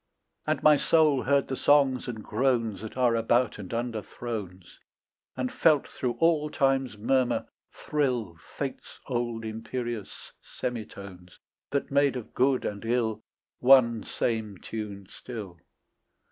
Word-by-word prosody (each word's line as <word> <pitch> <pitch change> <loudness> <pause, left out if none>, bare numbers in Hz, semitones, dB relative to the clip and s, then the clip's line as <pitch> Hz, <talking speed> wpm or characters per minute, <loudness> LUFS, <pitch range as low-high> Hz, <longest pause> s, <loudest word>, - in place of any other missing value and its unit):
And - - 0
my 150 -1 +7
soul 155 -3 +3
heard 140 +1 +2
the 135 - -2
songs 135 -2 +3
and 110 -3 -5
groans 115 -2 0
That 110 +3 -8
are 125 -2 +3
about 115 0 +2
and 95 -3 -8
under 115 -1 -2
thrones, 100 -7 -7 0.6
And 130 -1 -1
felt 155 -4 +3
through 125 -2 -2
all 160 -1 +2
time's 135 -5 +1
murmur 125 +3 +1 0.3
thrill 125 - -1 0.2
Fate's - - -5
old 120 -2 -2
imperious 115 0 -5
semitones 100 -6 -7 0.3
That 140 -1 -2
made 140 -1 +3
of 125 -4 -7
good 130 0 +2
and 100 -1 -4
ill 115 -1 0 0.4
One 125 -3 +5
same 110 -4 -2
tune 100 -1 -6
still. 100 -9 -8
120 Hz, 130 wpm, -28 LUFS, 110-135 Hz, 0.6 s, my